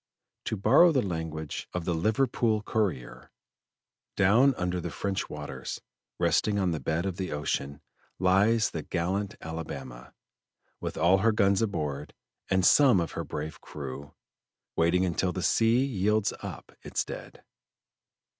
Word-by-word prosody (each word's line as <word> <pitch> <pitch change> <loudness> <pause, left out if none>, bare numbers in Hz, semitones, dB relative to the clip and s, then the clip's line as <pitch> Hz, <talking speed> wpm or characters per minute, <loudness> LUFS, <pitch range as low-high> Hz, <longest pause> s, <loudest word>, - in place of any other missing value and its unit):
To 110 - -2
borrow 135 - +6
the 135 -5 +2
language 80 -4 -4
of 90 -2 -2
the 90 - 0
Liverpool 110 +3 +1
Courrier: 95 - -2 0.9
"Down 115 +8 +5
under 90 0 -2
the - - -4
French 100 0 -3
waters, 75 -1 -6 0.4
resting 105 -1 +2
on 95 -3 +1
the 80 - -2
bed 80 +4 -1
of 95 -2 -3
the 95 -1 -3
ocean, 70 -1 -3 0.4
lies 100 +5 +3
the 80 - -4
gallant 95 +6 -2
Alabama, 70 -7 -7 0.6
with - - -5
all 90 +4 +4
her 110 +3 +3
guns 100 -2 +3
aboard, 75 -9 -3 0.3
and 95 -1 +2
some 130 -9 +6
of 85 -2 -2
her - - -4
brave 75 +1 -6
crew, 70 -1 -8 0.6
waiting 90 +3 +3
until 90 +1 0
the 90 0 -4
sea 115 +3 +3
yields 105 -3 +1
up - - -8
its - - -2
dead." - - -9
95 Hz, 140 wpm, -28 LUFS, 80-105 Hz, 0.9 s, borrow